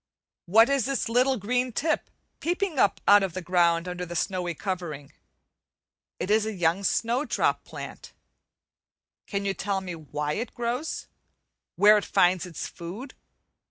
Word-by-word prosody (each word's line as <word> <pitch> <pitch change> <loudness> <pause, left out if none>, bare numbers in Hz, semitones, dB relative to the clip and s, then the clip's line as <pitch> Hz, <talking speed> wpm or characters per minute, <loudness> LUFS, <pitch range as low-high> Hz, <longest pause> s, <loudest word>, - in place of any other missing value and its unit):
What 225 +6 +6
is 275 -3 +1
this 275 -4 -1
little 255 +3 +3
green 250 +4 0
tip 310 +6 -1 0.3
peeping 350 -2 -1
up 205 - +3
out 205 0 +8
of 190 -3 -2
the - - -2
ground 170 -1 +2
under 180 0 -4
the 175 -1 -6
snowy 175 0 -1
covering? 165 -7 -5 1.1
It 185 - -2
is 215 0 +4
a 220 - -3
young 175 +2 +1
snowdrop 235 +8 +1
plant. - - -9 1.2
Can 200 -1 -3
you 195 - +1
tell 195 0 -2
me 185 -2 -6
why 150 -2 -4
it 230 +8 -4
grows? 245 +6 -3 0.7
where 210 +1 +7
it - - -7
finds 180 0 +2
its 165 - -6
food? 200 +11 -8
200 Hz, 150 wpm, -26 LUFS, 175-245 Hz, 1.2 s, out